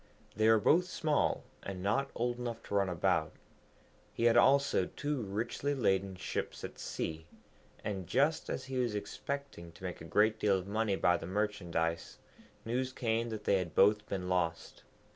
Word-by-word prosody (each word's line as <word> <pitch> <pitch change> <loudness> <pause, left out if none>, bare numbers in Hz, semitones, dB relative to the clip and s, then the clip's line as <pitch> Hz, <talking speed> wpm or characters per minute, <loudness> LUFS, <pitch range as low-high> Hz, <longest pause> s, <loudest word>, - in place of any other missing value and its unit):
They 110 +2 +4
were 110 - +7
both 170 - +4
small, 155 -4 0 0.2
and 95 -2 -6
not 135 +8 +1
old 120 +1 -1
enough 120 -2 -4
to - - -8
run 100 -2 +2
about. 85 -3 +1 0.8
He - - -3
had 115 -1 +5
also 140 +1 +4
two 145 -3 -3
richly 115 +7 -2
laden 95 -6 +1
ships - - -4
at - - -7
sea, 80 0 -4 0.6
and 95 -4 -3
just 145 +5 +1
as 130 - -3
he 135 -1 -3
was 120 -4 0
expecting 135 -4 -5
to 90 - -16
make 90 -3 -5
a - - -8
great 110 +5 +2
deal 100 -2 +3
of 90 - -5
money 105 0 0
by 90 -1 +3
the - - -7
merchandise, 90 -5 -1 0.5
news 125 +3 -1
came 115 -2 -1
that 110 -2 -5
they 100 - +3
had 90 -3 -5
both 105 +2 +4
been 95 -2 -3
lost. 85 -3 -1
105 Hz, 175 wpm, -33 LUFS, 95-125 Hz, 0.8 s, were